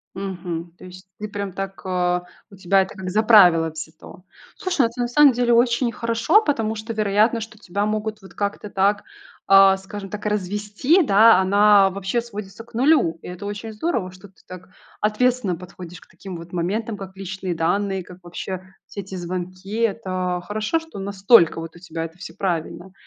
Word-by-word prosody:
Мгм. 175 -3 -5
То - - -13
есть 185 +1 -13
ты 210 - -4
прям 200 -2 -5
так, 195 0 -6
а, 180 -1 0 0.3
у - - -12
тебя 190 +1 +2
это 190 - -10
как 190 -1 -5
за 210 +4 +1
правило 175 -7 +6
взято. 160 +2 -10 0.3
Слушай, 360 - +1
это 235 +2 -4
на 240 - 0
самом 285 +3 +6
деле 240 0 +2
очень 235 +1 +3
хорошо, 230 - +2
потому 225 - -1
что 220 +2 -6
вероятно, 215 +2 +2
что 220 0 -9
тебя 200 0 -3
могут 215 0 -3
вот 190 - -15
как-то 205 0 -3
так, 200 +1 +1 0.4
а, 195 0 +7
скажем 195 +1 -8
так, 210 +1 -7
развести, 210 - +1
да, 220 -3 +6
она 200 +1 +5
вообще 195 +4 -2
сводится 210 -2 -9
к 235 +1 -23
нулю. 250 - +3
И - - -9
это 180 +3 -8
очень 205 +2 -6
здорово, 215 - -2
что 185 +2 -14
ты 190 - -26
так 185 0 -11 0.3
ответственно 215 -2 +1
подходишь 180 0 -11
к - - -20
таким 190 -3 -9
вот 170 +1 -12
моментам 210 +6 -2
как 195 -1 -10
личные 190 -1 -4
данные, 190 +3 0
как 180 +1 -14
вообще 175 +1 -6 0.2
все 200 - -7
эти 190 0 -9
звонки. 185 +3 -5
Это 185 -5 -1
хорошо, 215 +9 -1
что 325 -10 -11
настолько 195 -3 +4
вот 165 +1 -8
у - - -13
тебя 165 -2 -5
это 165 +1 -11
всё 180 - -9
правильно. 180 0 -3
195 Hz, 185 wpm, -22 LUFS, 185-220 Hz, 0.4 s, а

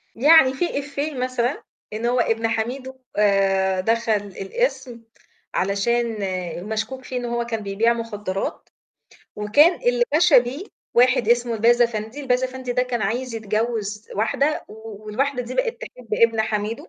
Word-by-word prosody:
يعني 275 +1 +6
في 345 +6 -2
إيفيه 285 +2 -3
مثلًا 255 0 -2 0.3
إن 225 +2 -3
هو 245 +1 +2
ابن 225 -1 +1
حميدو 250 +4 -3 0.2
آآ 195 -2 +2
دخل 230 +2 0 0.3
القِسم 260 - -2 0.5
علشان 225 +4 0 0.5
مشكوك 220 +4 -3
فيه 255 - -5
إن 245 - -3
هو 235 0 -2
كان 225 -2 -4
بيبيع 215 +4 +2
مخدرات، 210 -4 -4 0.7
وكان 285 +12 +4
اللي 245 0 +2
وَشَى 320 -4 +6
بيه 255 +9 -5 0.3
واحد 250 -2 +4
اسمه 240 0 +2
الباز 235 +2 +4
أفندي، 225 +3 -2
الباز 260 -2 +1
أفندي 255 -1 -4
ده 250 +1 +2
كان 245 -3 -2
عايز 240 +4 -2
يتجوز 215 -1 -2
واحدة 275 +8 0
و 215 -1 -11
والواحدة 250 +5 -1
دي 245 +1 -7
بقت - - -1
تحب 250 - -11
ابن 230 -1 +3
حميدو. 220 - -2
235 Hz, 145 wpm, -22 LUFS, 220-260 Hz, 0.7 s, يعني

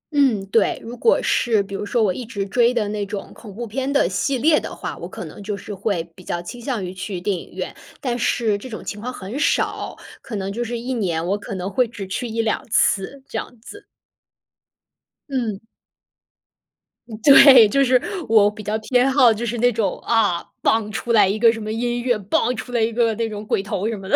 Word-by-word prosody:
嗯， 250 -9 +3
对， 225 -2 +2
如 235 +2 -7
果 455 - +3
是 225 -4 +2
比 195 0 -11
如 195 - -3
说 230 +1 +1
我 190 - +2
一 250 - -6
直 215 -4 -4
追 235 +4 +3
的 230 -4 0
那 210 -1 -2
种 200 -1 -6
恐 215 - -12
怖 240 +2 -4
片 260 +5 -3
的 280 -9 +3
系 195 +9 -1
列 305 +5 +4
的 - - -7
话， - - -5
我 - - -6
可 - - -7
能 - - -10
就 205 0 -4
是 205 - -8
会 195 -3 -1
比 185 - -15
较 175 - -3
倾 235 +8 -8
向 235 -7 -3
于 180 - -6
去 185 0 -5
电 190 +2 -1
影 170 - -9
院。 - - -5 0.2
但 245 -2 -2
是 230 -3 +1
这 255 - -9
种 220 - -7
情 210 - -5
况 250 +3 -4
很 225 +3 -6
少， - - 0 0.2
可 245 -5 -7
能 195 0 -3
就 240 - -2
是 240 0 -4
1 245 +3 -4
年， 175 -8 -1
我 195 +3 +1
可 200 - -6
能 185 0 -4
会 250 +5 +2
只 210 -3 -7
去 190 +6 -4
1-2 225 -1 -1
次， 215 +6 +1
这 - - -3
样 245 - -9
子。 415 - -12 1.4
嗯。 235 -7 -2 1.6
对， 270 -4 +9
就 275 +7 +2
是 255 -1 +3 0.3
我 215 -2 +6
比 210 +1 -10
较 210 +2 -1
偏 250 +4 +2
好， 255 -4 +6
就 225 +2 -4
是 235 +1 -2
那 245 +2 +4
种 220 -2 -1
啊 210 -7 +1 0.2
，𠳐， 220 -1 +2
出 235 +3 -3
来 210 -4 +6
一 200 +3 0
个 230 +1 +5
什 225 - -6
么 215 -1 -5
音 240 +2 -1
乐 240 -2 +1
，𠳐， 210 +4 0
出 230 +2 -7
来 240 - 0
一 225 +1 +1
个 230 -1 +2
那 230 +1 -1
种 210 0 -7
鬼 200 - 0
头 200 +1 -3
什 225 - -3
么 195 -1 -9
的。 - - +3
225 Hz, 240 characters per minute, -21 LUFS, 200-245 Hz, 1.6 s, 对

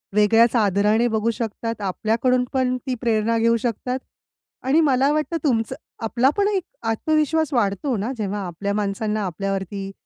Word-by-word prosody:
वेगळ्याच 225 +3 +4
आदराने 210 +2 +3
बघू 220 0 0
शकतात, 230 0 -4
आपल्याकडून 225 +6 +1
पण 255 -1 +1
ती 255 - 0
प्रेरणा 230 -1 +1
घेऊ 230 +1 +3
शकतात 250 +2 -2 0.7
आणि 285 +5 +4
मला 275 -1 +3
वाटतं 305 +2 -1
तुमचं 230 -7 0 0.3
आपला 240 +4 +2
पण 405 - +3
एक 395 -3 0 0.3
आत्मविश्वास 310 +4 +1
वाढतो 235 +3 0
ना 215 +6 -2
जेव्हा 205 -1 -2
आपल्या 200 +4 -3
माणसांना 210 +1 -1
आपल्यावरती 195 +2 -3
230 Hz, 145 wpm, -22 LUFS, 210-260 Hz, 0.7 s, वेगळ्याच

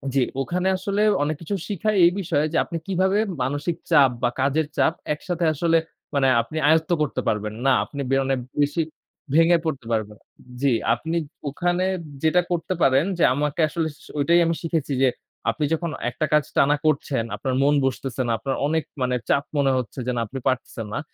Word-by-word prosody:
জি, - - +4 0.2
ওখানে 180 +6 -1
আসলে 200 +2 -1 0.2
অনেক 155 +2 -1
কিছু 185 +5 -3
শিখায় 210 +1 -1
এই 170 - +5
বিষয় 160 -6 0
যে - - +2
আপনি 170 - -5
কিভাবে 190 +1 +2 0.2
মানসিক 145 +6 -1 0.2
চাপ 135 -2 +7
বা 120 - +2
কাজের 140 +3 +1
চাপ - - +3 0.2
একসাথে 170 +2 -3
আসলে 165 +2 +2 0.4
মানে 135 -1 +3
আপনি 135 +7 -7
আয়ত্ত 160 +2 +3
করতে 145 -7 -1
পারবেন। 105 0 -1
না 135 - +5
আপনি 140 - -6
বেরনে 135 0 +2 0.3
বেশি 145 +3 +1 0.5
ভেঙে 165 +2 +5
পড়তে 140 -6 -3
পারবেন। 105 -1 -2 0.4
জি, 140 - +3 0.2
আপনি 160 +8 -3 0.3
ওখানে 175 +5 0 0.4
যেটা 160 +3 +4
করতে 175 +2 -1
পারেন 135 +4 +4
যে 170 - +2
আমাকে 150 +3 -1
আসলে 165 0 -1 0.2
স - - -16
ঐটাই 170 +4 +4
আমি 165 0 +1
শিখেছি 160 -4 -1
যে 135 - +5 0.4
আপনি 155 - -2
যখন 170 0 -1 0.2
একটা 130 +6 -2
কাজ 150 -1 +5
টানা 145 +1 +5
করছেন, 140 -5 +1
আপনার 130 - -3
মন 145 +1 +4
বসতেছে 135 -1 -2
না, - - +1
আপনার 135 +4 -2
অনেক 160 +1 0 0.2
মানে 125 0 +1
চাপ 140 - +3
মনে 140 -1 +3
হচ্ছে 125 0 -4
যে - - +1
না 120 - 0
আপনি 135 +5 -6
পারতেছেন 120 -3 -2
না। - - -1
150 Hz, 185 wpm, -23 LUFS, 135-170 Hz, 0.5 s, চাপ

